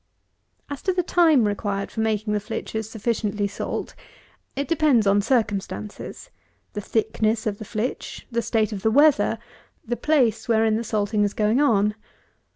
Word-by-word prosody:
As 285 -2 -6
to 375 - 0
the 360 0 0
time 320 -10 +4
required 205 -1 -2
for - - -6
making 215 -1 0
the 210 - +1
flitches 220 +1 -5
sufficiently 215 -2 -1
salt, 200 - -4 0.6
it 280 0 -2
depends 295 -8 +3
on 200 +1 +4
circumstances; 210 -3 -2 0.4
the 210 - -4
thickness 220 +1 0
of 205 -2 -2
the 215 - -7
flitch, 220 +3 -4
the 235 0 0
state 220 -1 0
of 195 - -5
the 220 - +2
weather, 265 -4 +4 0.5
the 240 +1 -1
place 240 -6 +1
wherein 220 -1 +3
the 225 - -1
salting 210 -1 0
is 205 - -1
going 215 +4 +2
on. 210 -7 +3
220 Hz, 160 wpm, -24 LUFS, 210-240 Hz, 0.6 s, time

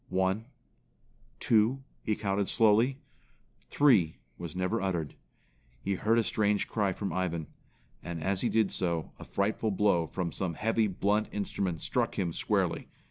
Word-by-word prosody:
"One, 95 +4 +1 0.9
two," 115 +4 +3 0.2
he 110 - 0
counted 100 -2 -1
slowly. 115 +4 +4 0.6
"Three" 110 - +3 0.2
was 85 +1 -7
never 90 0 0
uttered. 85 -6 -1 0.7
He 100 - -1
heard 110 +5 +2
a 115 - +4
strange 105 -2 +1
cry 100 -3 0
from 100 +2 -3
Ivan; 85 -3 -1 0.6
and 85 -2 -5
as 95 0 0
he 120 - +1
did 110 -3 +2
so, 85 -3 -1
a - - -8
frightful 105 +2 0
blow 95 -5 +2
from 90 -1 -3
some 90 -2 -3
heavy, 115 +2 +1
blunt 105 +2 +1
instrument 95 -4 -2
struck - - -1
him 85 -4 0
squarely. - - 0
100 Hz, 145 wpm, -30 LUFS, 90-110 Hz, 0.9 s, slowly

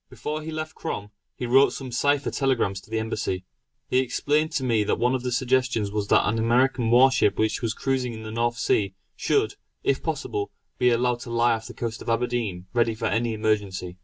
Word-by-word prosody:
Before 155 +1 -4
he 155 - -6
left 155 0 -4
Crom, 105 -10 -5 0.2
he 125 - -4
wrote 135 +3 +5
some 130 -2 -6
cipher 145 +4 +1
telegrams 120 -8 0
to - - -20
the 110 - -1
Embassy. 105 -4 -2 0.4
He 130 - +2
explained 150 +4 +1
to 145 -5 0
me 115 -4 +2
that - - 0
one 125 +2 +2
of 130 - 0
his 125 -1 0
suggestions 125 -5 +1
was 105 -1 -2
that - - +4
an 115 +2 0
American 120 +1 +2
war 125 +3 +6
ship 105 - +2
which 110 0 0
was 115 -1 -1
cruising 130 -3 -1
in 110 - -8
the 110 - -6
North 120 +1 0
Sea 100 -4 +1 0.2
should, 415 -1 +1 0.3
if - - +1
possible, 410 0 -3 0.3
be 125 - +4
allowed 120 0 +1
to 120 - -8
lie 120 0 +3
off 115 0 -4
the - - -10
coast 115 -1 -4
of - - -6
Aberdeen 115 -6 -1
ready 115 -2 +2
for - - -4
any 115 0 0
emergency. 100 -4 -1
120 Hz, 215 wpm, -25 LUFS, 110-130 Hz, 0.4 s, war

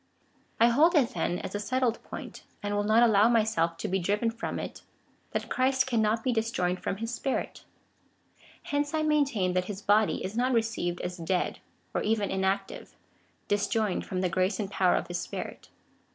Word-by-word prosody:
1 235 +1 +5
liold 320 +8 +4
it, 265 -6 +4
then, 175 - -1
as - - -6
a 205 - -2
settled 245 +2 0
point, - - -8 0.2
and 205 0 -2
will 205 0 +1
not 220 +3 +5
allow 220 -1 +5
my 230 -2 +4
self 165 -6 0
to - - -3
be 190 +1 0
driven 205 +5 0
from 230 - -4
it, - - -6 0.5
that - - -3
Christ 260 0 +2
cannot 225 -3 +1
be 255 - +1
disjoined 200 -6 -1
from - - -2
his 230 +3 -4
Spirit. 265 +2 -3 1.0
Hence 290 +1 -1
I 310 - +1
maintain, 280 -12 +2
that 180 0 +1
his 200 +1 -6
body 210 +1 +3
is 195 +3 -5
not 250 +2 +1
received 225 -7 -1
as 180 +1 -4
dead, 175 +2 -1 0.3
or - - 0
even 210 -2 0
inactive, 190 +1 -2 0.5
disjoined 205 0 0
from 185 -1 -3
the 185 - +2
grace 185 +3 0
and 200 -2 -3
power 185 -2 +3
of - - -1
his 175 0 -3
Spirit. - - -6
215 Hz, 185 wpm, -28 LUFS, 190-240 Hz, 1.0 s, 1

